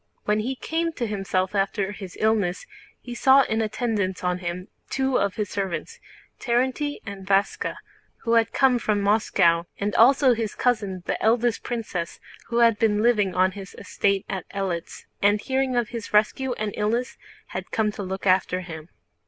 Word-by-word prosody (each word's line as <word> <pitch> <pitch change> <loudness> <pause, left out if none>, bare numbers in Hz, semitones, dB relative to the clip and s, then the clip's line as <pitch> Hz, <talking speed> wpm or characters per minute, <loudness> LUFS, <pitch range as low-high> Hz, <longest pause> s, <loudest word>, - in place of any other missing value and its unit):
When 210 0 +2
he 250 +5 -2
came 330 +4 -2
to 245 - -2
himself 195 -3 -1
after 200 0 0
his 195 -3 -9
illness 215 -5 +1 0.4
he 245 - -7
saw 265 +3 +5
in 220 -2 -1
attendance 215 -4 -1
on 180 0 0
him 180 +1 -5 0.2
two 265 -1 +1
of 200 -2 0
his 210 -3 -3
servants, 200 - -4 0.4
Terénty 260 +4 0
and 200 -2 -7
Váska, 195 +1 0 0.5
who 230 - +1
had 230 -1 +3
come 260 -3 +3
from 215 -2 0
Moscow; 175 -5 +3
and 205 +1 -2
also 260 +2 +5
his 225 -2 -3
cousin 205 -7 0
the - - -2
eldest 235 +1 +2
princess, 210 -8 -4 0.3
who 235 0 +1
had 230 -3 +4
been 215 -2 +2
living 210 -6 +2
on 185 +1 +3
his 195 -1 -10
estate 200 -1 0
at 190 -3 -5
Eléts 190 -4 -4 0.2
and 205 +1 +4
hearing 265 +2 -1
of 240 -2 +1
his 230 -3 -6
rescue 245 +5 +2
and 215 -3 -3
illness 235 +5 -1 0.3
had - - -6
come 215 -1 0
to 205 - -7
look 190 0 -5
after 185 -1 +2
him. 165 -2 -9
210 Hz, 170 wpm, -24 LUFS, 190-240 Hz, 0.5 s, saw